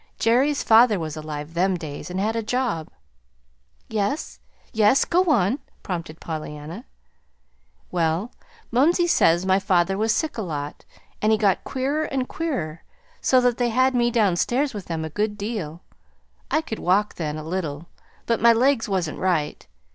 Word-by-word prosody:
Jerry's 265 +6 +2
father 225 -1 +6
was 160 -3 -4
alive 155 0 -6
them 185 +2 +1
days, 155 +1 -7
and 180 +1 -3
had 215 +3 0
a 230 - 0
job." 225 -8 -2 1.0
"Yes, 220 +7 -2 0.3
yes, 220 +3 +4
go 360 +2 +2
on," 250 - +2 0.2
prompted 165 -3 -5
Pollyanna. 155 - -6 1.1
"Well, 170 +6 0 0.4
mumsey 325 +9 +3
says 175 - +3
my 190 0 +3
father 190 0 +1
was 220 +1 +2
sick 315 -3 -1
a - - 0
lot, 150 -6 -5 0.4
and 215 - +3
he 220 - +4
got 200 -4 +2
queerer 280 +4 -1
and 265 -3 -2
queerer, 180 - -3 0.4
so 260 - +4
that 245 -1 +1
they 245 -1 +2
had 255 +3 +3
me 240 -1 +2
downstairs 240 +5 +1
with 205 -3 -6
them 160 -2 -3
a - - -5
good 210 +3 -1
deal. 200 -7 -5 0.7
I 310 - +2
could 220 -8 -6
walk 200 +4 +2
then, 155 -2 -4
a 155 - -6
little, 160 -2 -4 0.4
but 230 -1 0
my 235 0 +7
legs 245 -1 +2
wasn't 180 -5 -1
right. 170 -6 -1
205 Hz, 160 wpm, -23 LUFS, 165-245 Hz, 1.1 s, my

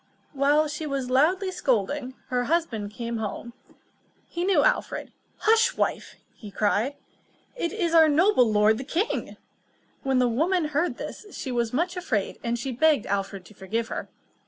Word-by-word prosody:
While 290 +2 +3
she 300 +1 -5
was 270 -3 -3
loudly 365 +9 +3
scolding, 260 - -1
her 245 -1 0
husband 250 -10 -1
came 235 +1 -4
home. 220 +2 -5 0.7
He 345 - -4
knew 385 0 +3
King - - +3
Alfred. - - 0 0.3
"Hush, 455 +1 +3
wife!" - - -1 0.4
cried 210 +7 +1 0.6
he. - - -2
"It 335 - -1
is 355 -6 -1
our 320 -2 +7
noble 300 - +4
lord 215 +1 +4
the - - -4
king!" 340 - -2 0.6
When 270 -1 +1
the 250 -1 +4
woman 315 +7 +1
heard 305 +4 0
this, 425 - -7
she 265 - -4
was 235 -2 0
much 345 +7 -1
afraid, 225 - -2
and 235 0 -1
she 260 +3 -4
begged 290 -1 +3
Alfred 195 -1 -3
to 215 - -15
forgive 220 +4 -3
her. - - -5
270 Hz, 165 wpm, -26 LUFS, 230-335 Hz, 0.7 s, our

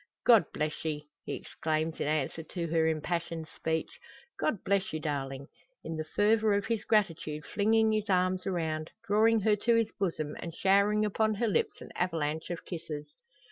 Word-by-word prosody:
"God 230 -4 +7
bless 150 0 -3
ye!" 150 -2 -3 0.2
he - - -3
exclaims 155 0 -2
in - - -1
answer 155 +1 -1
to 170 +1 -4
her 160 0 +3
impassioned 165 +1 -2
speech. 160 +1 -3 0.4
"God 225 -11 0
bless 195 -1 +1
you, 155 - -1
darling!" 140 -3 -3 0.4
in 165 - -4
the 155 - -2
fervour 215 0 +4
of 200 0 0
his 225 -2 -1
gratitude 165 -8 +1
flinging 220 +1 +3
his 215 -1 -1
arms 185 0 +2
around, 160 -4 -1 0.2
drawing 220 +1 +4
her 210 +1 +4
to 235 +3 +3
his 225 -1 +2
bosom, 155 -6 -1
and 170 -1 -6
showering 200 +3 +3
upon 215 +1 +1
her 230 +3 0
lips 210 - 0
an - - -10
avalanche 160 -3 -1
of 175 -1 -5
kisses. 160 -4 -6
175 Hz, 175 wpm, -30 LUFS, 155-210 Hz, 0.4 s, God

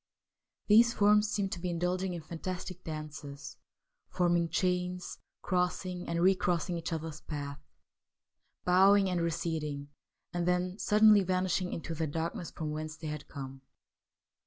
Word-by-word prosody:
These 235 +3 +6
forms 210 0 +4
seemed 200 -2 -1
to - - -3
be 180 +1 -3
indulging 180 +2 -1
in 165 - -6
fantastic 180 +2 -6
dances, 155 -2 -7 0.5
form, 175 -1 +2
ing 170 -1 +1
chains, 180 +1 -1 0.2
crossing 180 0 -1
and 170 0 0
recrossing 180 -2 +2
each 170 0 -4
other's 160 -1 -4
path, 145 -2 -5 1.1
bowing 195 +2 +5
and 175 -1 0
receding, 155 -4 -2 0.4
and 175 0 -1
then 180 +2 0
suddenly 210 -1 +6
vanishing 185 -1 0
into 165 0 -4
the 160 0 -1
darkness 165 +3 -3
from 155 -2 -5
whence 155 +1 -5
they 155 -2 -5
had 150 -1 -6
come. 135 -2 -8
175 Hz, 135 wpm, -31 LUFS, 160-185 Hz, 1.1 s, These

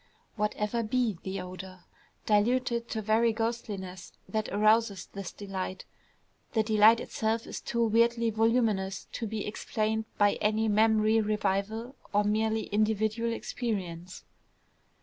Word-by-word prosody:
Whatever 210 +1 -1
be 225 -4 0
the 190 +1 -4
odor, 185 0 -9 0.4
diluted 235 +2 +1
to 220 -1 -3
very 225 +2 +3
ghostliness, 215 -5 -4
that 215 -1 -2
arouses 215 -1 +2
this 195 -3 -7
delight, 190 -2 -5 0.7
the 220 - +3
delight 215 +1 +6
itself 225 0 -2
is - - -6
too 235 0 0
weirdly 230 +1 +3
voluminous 220 -4 +1
to 230 - -4
be 215 -1 -3
explained 215 +1 -2
by 205 -1 +3
any 215 +1 +2
memory 220 +1 +4
revival 215 +4 -1 0.2
of 205 0 +4
merely 220 +1 +1
individual 215 +2 0
experience. 185 -7 -4
215 Hz, 120 wpm, -29 LUFS, 205-225 Hz, 0.7 s, delight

